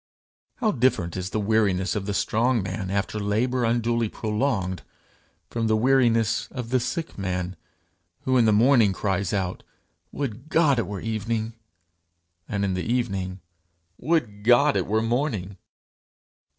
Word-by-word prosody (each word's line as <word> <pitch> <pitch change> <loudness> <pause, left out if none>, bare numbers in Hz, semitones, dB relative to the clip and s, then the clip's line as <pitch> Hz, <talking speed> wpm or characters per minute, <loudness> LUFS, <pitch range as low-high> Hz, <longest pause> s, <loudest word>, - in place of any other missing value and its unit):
How 220 -4 +1
different 120 - +1
is 95 0 -3
the 110 - -2
weariness 100 -3 +1
of 100 -1 -3
the 100 - -1
strong 115 +1 +1
man 95 0 -4
after 100 +2 -1
labour 120 +5 0
unduly 115 -1 +1
prolonged, 105 -5 -1 0.7
from 115 -1 -1
the 110 0 +3
weariness 115 -3 +2
of 125 -3 -6
the 130 - +3
sick 155 +1 -4
man 90 -1 -2 0.7
who 130 - 0
in 120 -2 +5
the 110 - +4
morning 115 -1 +5
cries 95 -1 -1
out, 95 -3 -2 0.5
'Would 135 +1 -5
God 155 -7 +3
it 115 - -1
were 100 -2 -5
evening!' 110 +1 -2 1.0
and 100 -3 -1
in 95 - 0
the 90 - -2
evening, 100 -5 -2 0.6
'Would 120 -10 -1
God 125 +6 +5
it - - 0
were 110 +2 +1
morning!' 115 -6 -1
110 Hz, 145 wpm, -25 LUFS, 100-125 Hz, 1.0 s, in